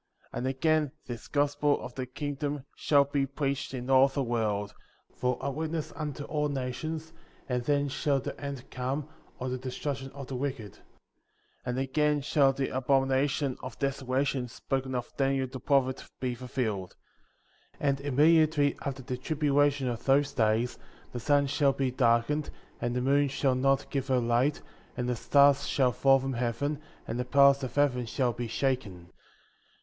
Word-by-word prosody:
31. -, -, -4 dB
And 130 Hz, -, -2 dB
again, 155 Hz, 0 st, +2 dB
this 120 Hz, -3 st, -7 dB
Gospel 145 Hz, 0 st, +1 dB
of 120 Hz, -, -8 dB
the 130 Hz, 0 st, -4 dB
Kingdom 145 Hz, +1 st, -4 dB
shall 145 Hz, -2 st, +4 dB
be 140 Hz, -1 st, -1 dB
preached 140 Hz, 0 st, -2 dB
in 125 Hz, -2 st, -5 dB
all 135 Hz, 0 st, +6 dB
the 140 Hz, 0 st, -2 dB
world, 105 Hz, -4 st, -1 dB, 0.4 s
for 125 Hz, -1 st, 0 dB
a 140 Hz, -, -2 dB
witness 160 Hz, +1 st, -3 dB
unto 150 Hz, -2 st, -4 dB
all 150 Hz, 0 st, -1 dB
nations, 155 Hz, +5 st, -4 dB, 0.3 s
and 125 Hz, -1 st, -1 dB
then 145 Hz, +1 st, +2 dB
shall 140 Hz, 0 st, 0 dB
the -, -, -5 dB
end 140 Hz, -3 st, -6 dB
come, 135 Hz, +3 st, -3 dB, 0.3 s
or 130 Hz, -, -4 dB
the 130 Hz, 0 st, -3 dB
destruc 130 Hz, +2 st, -3 dB
tion 135 Hz, 0 st, -8 dB
of 140 Hz, -1 st, -7 dB
the 130 Hz, -, -6 dB
wicked; 125 Hz, -6 st, -4 dB
32. -, -, -24 dB, 0.8 s
And 125 Hz, 0 st, -1 dB
again 145 Hz, +2 st, +1 dB
shall 140 Hz, 0 st, +3 dB
the 135 Hz, 0 st, -2 dB
abomination 135 Hz, +1 st, +1 dB
of 125 Hz, -4 st, -7 dB
desola 135 Hz, +1 st, 0 dB
tion, 130 Hz, -3 st, -1 dB
spoken 130 Hz, +2 st, -3 dB
of 125 Hz, -, -3 dB
by 135 Hz, -, +1 dB
Daniel 135 Hz, -1 st, +1 dB
the 130 Hz, 0 st, -7 dB
prophet, 130 Hz, 0 st, +1 dB, 0.2 s
be 125 Hz, -1 st, -1 dB
fulfilled. 115 Hz, -6 st, -3 dB, 0.8 s
33. 140 Hz, -, +1 dB
And 140 Hz, 0 st, 0 dB
immediately 150 Hz, +1 st, +3 dB
after 135 Hz, -2 st, -4 dB
the 125 Hz, +1 st, -4 dB
tribulation 145 Hz, -1 st, +1 dB
of 120 Hz, -1 st, -4 dB
those 140 Hz, +1 st, +3 dB
days, 115 Hz, +1 st, +1 dB, 0.3 s
the 120 Hz, -, -4 dB
sun 145 Hz, +3 st, +3 dB
shall 140 Hz, 0 st, +2 dB
be 135 Hz, -2 st, -1 dB
darkened, 125 Hz, +4 st, +2 dB, 0.3 s
and 120 Hz, 0 st, -1 dB
the 125 Hz, -, 0 dB
moon 140 Hz, +2 st, +3 dB
shall 135 Hz, -1 st, +1 dB
not 135 Hz, +2 st, +1 dB
give 135 Hz, -1 st, -1 dB
her 130 Hz, -2 st, +2 dB
light, 120 Hz, +4 st, +1 dB, 0.3 s
and 125 Hz, -1 st, -1 dB
the 125 Hz, -, 0 dB
stars 140 Hz, +4 st, +4 dB
shall 130 Hz, -3 st, +2 dB
fall 135 Hz, +2 st, +4 dB
from 135 Hz, 0 st, -3 dB
heaven, 125 Hz, +5 st, -1 dB, 0.3 s
and 120 Hz, -, -3 dB
the -, -, +1 dB
powers 140 Hz, +1 st, +5 dB
of 130 Hz, -3 st, -5 dB
heaven 130 Hz, -4 st, +2 dB
shall 125 Hz, 0 st, 0 dB
be 120 Hz, +1 st, -4 dB
shaken. 110 Hz, -9 st, -2 dB
135 Hz, 175 wpm, -29 LUFS, 125-145 Hz, 0.8 s, all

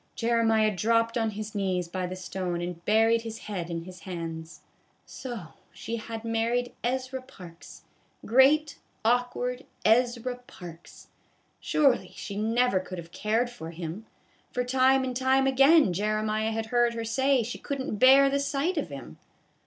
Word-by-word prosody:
Jeremiah 225 Hz, -2 st, +2 dB
dropped 230 Hz, +3 st, +1 dB
on 225 Hz, -2 st, +1 dB
his 215 Hz, 0 st, -6 dB
knees 185 Hz, -4 st, -1 dB
by 180 Hz, +1 st, -3 dB
the 185 Hz, -, -5 dB
stone 185 Hz, -1 st, -4 dB
and 175 Hz, -1 st, -5 dB
buried 225 Hz, +2 st, +4 dB
his 225 Hz, -1 st, -6 dB
head 180 Hz, -5 st, -5 dB
in 165 Hz, -1 st, -4 dB
his 180 Hz, +1 st, -11 dB
hands. 165 Hz, -3 st, -7 dB, 0.4 s
So 235 Hz, -11 st, -7 dB, 0.2 s
she 200 Hz, +6 st, -5 dB
had 225 Hz, 0 st, -7 dB
married 230 Hz, +2 st, 0 dB
Ezra 260 Hz, +1 st, -2 dB
Parks, 180 Hz, -10 st, -13 dB, 0.4 s
great 285 Hz, +5 st, +4 dB, 0.3 s
awkward 245 Hz, +2 st, 0 dB, 0.2 s
Ezra 245 Hz, +2 st, +2 dB
Parks. 170 Hz, -2 st, -12 dB, 0.5 s
Surely 275 Hz, -5 st, +2 dB
she 200 Hz, -, -7 dB
never 225 Hz, 0 st, +2 dB
could 185 Hz, 0 st, -7 dB
have 170 Hz, -1 st, -9 dB
cared 225 Hz, +6 st, 0 dB
for 165 Hz, -9 st, -8 dB
him, 170 Hz, +6 st, -7 dB, 0.4 s
for 250 Hz, -, -1 dB
time 260 Hz, +1 st, +3 dB
and 255 Hz, -1 st, -3 dB
time 265 Hz, +1 st, +2 dB
again 270 Hz, -, +5 dB
Jeremiah 215 Hz, +2 st, 0 dB
had 225 Hz, 0 st, -2 dB
heard 240 Hz, -1 st, +3 dB
her 230 Hz, 0 st, -3 dB
say 265 Hz, +2 st, +2 dB
she 240 Hz, +3 st, -6 dB
could 280 Hz, -1 st, -4 dB
n't 220 Hz, -5 st, -4 dB
bear 270 Hz, +2 st, +7 dB
the 280 Hz, +1 st, +1 dB
sight 280 Hz, +5 st, -1 dB
of 180 Hz, -, -2 dB
him. 135 Hz, -, -9 dB
225 Hz, 155 wpm, -27 LUFS, 185-250 Hz, 0.5 s, bear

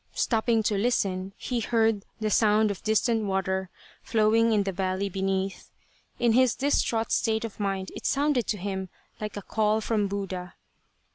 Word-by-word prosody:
Stopping 225 Hz, -1 st, +1 dB
to 210 Hz, 0 st, +1 dB
listen, 195 Hz, -4 st, 0 dB
he 245 Hz, -2 st, -2 dB
heard 225 Hz, -2 st, +1 dB
the 215 Hz, -1 st, -1 dB
sound 215 Hz, 0 st, +4 dB
of 195 Hz, -, -7 dB
distant 220 Hz, 0 st, +1 dB
water 190 Hz, -1 st, -1 dB, 0.3 s
flowing 225 Hz, +1 st, +3 dB
in 210 Hz, -2 st, +3 dB
the 195 Hz, -, -2 dB
valley 190 Hz, +1 st, -1 dB
beneath. 190 Hz, 0 st, -2 dB, 0.5 s
In 235 Hz, -2 st, +3 dB
his 255 Hz, 0 st, +4 dB
distraught 240 Hz, -5 st, 0 dB
state 220 Hz, +1 st, +1 dB
of 220 Hz, -, -8 dB
mind 195 Hz, -2 st, -2 dB
it -, -, -4 dB
sounded 280 Hz, -4 st, +1 dB
to 210 Hz, -, -1 dB
him 190 Hz, -1 st, -4 dB, 0.3 s
like 210 Hz, -1 st, -5 dB
a 205 Hz, -, -6 dB
call 215 Hz, +1 st, +1 dB
from 215 Hz, -2 st, 0 dB
Buddha. 190 Hz, -3 st, -5 dB
210 Hz, 160 wpm, -27 LUFS, 195-225 Hz, 0.5 s, sound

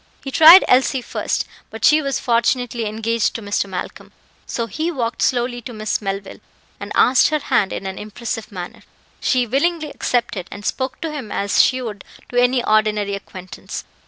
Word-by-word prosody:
He 270 Hz, -, -5 dB
tried 330 Hz, +5 st, +9 dB
Elsie 260 Hz, 0 st, +3 dB
first, -, -, -2 dB, 0.2 s
but 225 Hz, -, -3 dB
she 305 Hz, +1 st, +5 dB
was 275 Hz, -2 st, -2 dB
fortunately 235 Hz, -1 st, 0 dB
engaged 225 Hz, +1 st, -1 dB
to 230 Hz, -, -4 dB
Mr. 205 Hz, 0 st, -1 dB
Malcolm, 180 Hz, -1 st, -7 dB, 0.4 s
so 235 Hz, -, -2 dB
he 310 Hz, -, -3 dB
walked 240 Hz, -6 st, -3 dB
slowly 245 Hz, -1 st, 0 dB
to 245 Hz, +1 st, -8 dB
Miss 215 Hz, 0 st, -2 dB
Melville, 195 Hz, -1 st, -5 dB, 0.4 s
and -, -, -8 dB
asked 255 Hz, +1 st, +5 dB
her 305 Hz, -, +1 dB
hand 205 Hz, -9 st, 0 dB
in -, -, -5 dB
an 190 Hz, 0 st, -5 dB
impressive 220 Hz, +1 st, -6 dB
manner. 180 Hz, -3 st, -8 dB, 0.4 s
She 255 Hz, -2 st, +1 dB
willingly 300 Hz, +5 st, 0 dB
accepted, 230 Hz, -7 st, -2 dB
and 205 Hz, +1 st, -9 dB
spoke 260 Hz, 0 st, -2 dB
to 325 Hz, -, -3 dB
him 270 Hz, -8 st, -7 dB
as 200 Hz, 0 st, +2 dB
she 255 Hz, 0 st, +1 dB
would 210 Hz, -4 st, -6 dB, 0.3 s
to 245 Hz, 0 st, +2 dB
any 245 Hz, 0 st, +2 dB
ordinary 215 Hz, -1 st, +1 dB
acquaintance. 185 Hz, -2 st, -8 dB
235 Hz, 175 wpm, -20 LUFS, 210-260 Hz, 0.4 s, tried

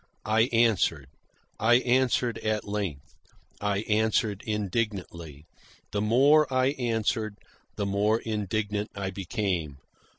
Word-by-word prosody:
I 110 Hz, +3 st, +3 dB
answered. 105 Hz, -, +2 dB, 0.5 s
I 115 Hz, +2 st, +4 dB
answered 125 Hz, -1 st, +2 dB
at 110 Hz, -1 st, -2 dB
length. 100 Hz, -9 st, -4 dB, 0.5 s
I 100 Hz, -1 st, 0 dB
answered 110 Hz, -1 st, +1 dB
indignantly. 95 Hz, -8 st, -3 dB, 0.5 s
The 100 Hz, -, -1 dB
more 135 Hz, +8 st, +4 dB
I 130 Hz, 0 st, +3 dB
answered, 115 Hz, -5 st, -1 dB, 0.4 s
the 100 Hz, -, -2 dB
more 105 Hz, +3 st, +1 dB
indignant 105 Hz, -1 st, -2 dB
I 100 Hz, -1 st, -3 dB
became. 95 Hz, -, -3 dB
105 Hz, 105 wpm, -27 LUFS, 100-115 Hz, 0.5 s, I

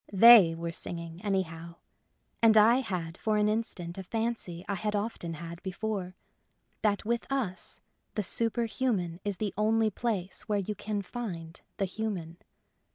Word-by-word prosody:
They 200 Hz, -5 st, +9 dB
were 170 Hz, 0 st, -4 dB
singing 170 Hz, 0 st, -4 dB
anyhow; 170 Hz, -4 st, -2 dB, 0.7 s
and 225 Hz, -1 st, +6 dB
I 225 Hz, +3 st, +7 dB
had 180 Hz, -9 st, -3 dB
for 215 Hz, -1 st, +1 dB
an 210 Hz, 0 st, +3 dB
instant 195 Hz, -5 st, -2 dB
a -, -, -5 dB
fancy 220 Hz, -5 st, -3 dB
I 200 Hz, -, -1 dB
had 210 Hz, +2 st, -2 dB
often 200 Hz, -6 st, -3 dB
had 170 Hz, +2 st, -8 dB
before: 190 Hz, -1 st, -3 dB, 0.7 s
that 205 Hz, -2 st, +1 dB
with 235 Hz, +3 st, -1 dB
us 210 Hz, -10 st, -1 dB, 0.3 s
the 210 Hz, -, 0 dB
superhuman 225 Hz, -5 st, 0 dB
is 205 Hz, -2 st, -2 dB
the 210 Hz, -2 st, -2 dB
only 220 Hz, +1 st, +2 dB
place 205 Hz, -4 st, -3 dB
where 210 Hz, -, +2 dB
you 200 Hz, +1 st, -2 dB
can 205 Hz, 0 st, -3 dB
find 175 Hz, -7 st, -6 dB, 0.2 s
the 195 Hz, -, +1 dB
human. 185 Hz, -5 st, -4 dB
200 Hz, 150 wpm, -30 LUFS, 175-220 Hz, 0.7 s, They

